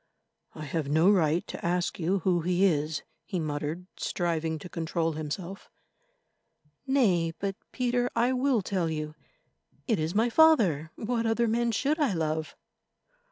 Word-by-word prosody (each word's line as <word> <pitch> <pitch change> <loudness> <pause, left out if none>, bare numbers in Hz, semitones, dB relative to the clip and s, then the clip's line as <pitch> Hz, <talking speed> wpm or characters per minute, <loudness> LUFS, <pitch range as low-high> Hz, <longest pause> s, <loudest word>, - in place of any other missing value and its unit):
"I 155 - -7
have 145 0 -2
no 160 +6 +5
right 170 -3 +2
to - - -8
ask 175 +1 -1
you 180 +3 0
who 175 -1 +2
he 180 +3 +2
is," 155 -3 0 0.2
he 185 -4 -3
muttered, 155 +3 -3
striving 165 -2 -1
to 155 - -9
control 165 -1 -1
himself. 160 +5 -6 1.2
"Nay, 185 -12 +2
but, 195 -1 -3 0.2
Peter, 245 0 0
I 245 +2 +2
will 255 -4 +1
tell 180 -3 -1
you. 155 -1 -4 0.7
It 225 -8 +1
is 160 +4 -2
my 230 +3 +2
father—what 230 - +3
other 230 +1 +2
man 235 +1 +1
should 285 +7 0
I 285 -9 +2
love?" 160 -1 -2
180 Hz, 145 wpm, -28 LUFS, 160-225 Hz, 1.2 s, no